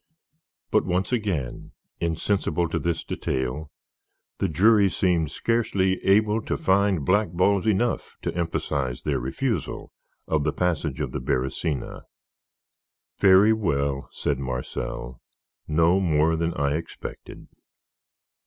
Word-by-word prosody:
But - - +3
once 90 +3 -1
again, 95 - -2 0.3
insensible 85 0 0
to - - -1
this 85 -1 -1
detail, 65 +3 -3 0.7
the 95 - +1
jury 100 +4 +5
seemed 85 -4 +1
scarcely 100 -4 0
able 105 +3 +3
to - - -2
find 95 -5 +2
blackballs 100 +1 +2
enough 110 +3 0
to - - -2
emphasize 70 -7 -2
their - - 0
refusal 65 +2 -3 0.4
of 80 -2 +1
the - - 0
"Passage 85 -6 -1
of - - -2
the - - -4
Beresina." 65 +3 -2 1.2
"Very 100 +3 +6
well," 70 -10 -1
said 70 -2 -2
Marcel; 65 -1 -5 0.5
"no 85 +4 +3
more 80 -3 +2
than 85 +1 -1
I 70 0 +1
expected. 85 - -9
85 Hz, 115 wpm, -25 LUFS, 70-95 Hz, 1.2 s, Very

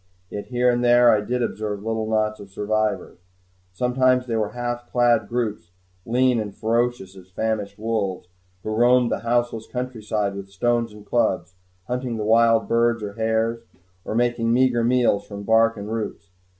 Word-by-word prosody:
Yet 105 - -6
here 125 0 +2
and 120 0 0
there 120 0 +6
I 105 - +3
did 125 +3 -1
observe 105 -3 -3
little 110 -1 -2
knots 110 -1 0
of 100 -1 -11
survivors. 105 -2 -2 0.5
Sometimes 125 +5 +2
they 115 -2 -2
were 110 -2 -1
half 120 0 -4
clad 120 -3 +3
groups, 110 -7 -3 0.3
lean 125 +1 +2
and 105 -2 -5
ferocious 115 -3 -1
as 95 -1 -14
famished 105 0 -3
wolves, 105 -5 -2 0.4
who 110 - -3
roamed 120 +1 +4
the - - 0
houseless 120 -1 -1
countryside 110 -5 -3
with 100 0 -8
stones 115 +3 0
and 105 0 -14
clubs, 95 -6 0 0.3
hunting 125 -1 -3
the 105 - -3
wild 115 +1 +4
birds 115 -1 +1
and 100 -1 -6
hares, 115 +1 0 0.4
or - - -4
making 120 -1 +1
meager 125 -1 +3
meals 120 -4 +2
from 100 -1 -7
bark 115 +2 +3
and 105 +1 -6
roots. 105 -3 -5
115 Hz, 165 wpm, -23 LUFS, 105-120 Hz, 0.5 s, there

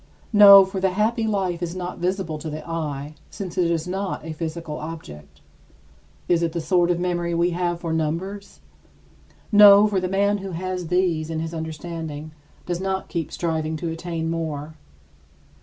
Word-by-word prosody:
No, 200 -2 +10
for 190 0 -5
the 190 -1 +1
happy 220 +3 +1
life 190 -5 -1
is 175 0 -3
not 180 -1 -5
visible 180 -3 -2
to 155 - -6
the 155 +1 -7
eye, 150 -3 -4 0.2
since 185 -4 -7
it 180 -3 +2
is 165 0 -1
not 190 -3 -3
a 160 - -5
physical 160 -1 -5
object. 155 - -9 0.9
Is 170 -1 +2
it 165 -1 -1
the 170 - -2
sort 175 +1 +2
of 175 -1 +1
memory 175 -1 -1
we 170 +1 +2
have 175 0 -1
for 165 -2 -2
numbers? 170 +6 -3 0.9
No, 205 -1 +9
for 205 -3 +1
the 185 0 -2
man 200 +2 +1
who 195 -1 -6
has 180 0 -4
these 175 -3 0
in 160 -1 -3
his 165 +1 -4
understanding 160 -1 -6 0.3
does 175 0 -3
not 190 0 -2
keep 165 -4 -3
striving 160 -2 -2
to 165 +2 -4
attain 165 0 -4
more. 155 -2 -4
170 Hz, 175 wpm, -23 LUFS, 160-190 Hz, 0.9 s, No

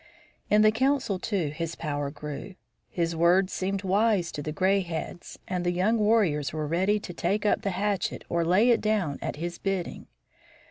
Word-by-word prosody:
In 210 +1 +5
the 215 - +6
council, 260 -4 +1
too, 185 -6 -1
his 165 +2 -4
power 145 -3 -3
grew. 150 +7 -7 0.3
His 170 -1 -1
words 180 +3 +3
seemed 195 +1 -2
wise 195 -2 +2
to 145 - -5
the 155 - -4
gray 190 +4 +2
heads, 175 -1 -6
and 180 -1 -2
the 175 - +1
young 190 +6 +1
warriors 195 - +2
were 155 -1 -3
ready 190 +7 +1
to 180 - -8
take 195 +5 -1
up 210 - +2
the 200 - -1
hatchet 200 +1 -1
or 170 0 0
lay 190 +9 +4
it 235 - +3
down 205 -10 0
at - - -3
his 170 +3 -5
bidding. 195 -3 -3
185 Hz, 185 wpm, -27 LUFS, 165-205 Hz, 0.3 s, the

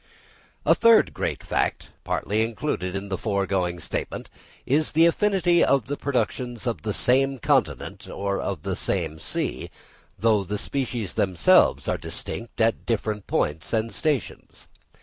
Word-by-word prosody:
A - - +6
third 230 -1 +5
great - - -3
fact, - - -1
partly 105 +2 -1
included 110 -5 -2
in 100 +1 -4
the 95 - -3
foregoing 95 -4 -1
statement, 75 - -5 0.3
is 150 +4 +1
the 165 +2 +6
affinity 175 0 +3
of 140 -3 +3
the 145 - -3
productions 120 -3 -2
of 120 -2 -2
the 110 - -2
same 135 +5 +2
continent 115 - 0
or 100 0 -2
of - - -4
the - - -2
same 80 -5 -1
sea, - - -3 0.5
though 110 -3 +3
the 105 +2 -3
species 120 -4 -3
themselves 95 -4 +3
are - - 0
distinct 115 +1 -6
at 115 0 +1
different 110 -2 -2
points 75 +5 -1
and 110 0 0
stations. 150 -6 -3
115 Hz, 145 wpm, -25 LUFS, 100-135 Hz, 0.5 s, A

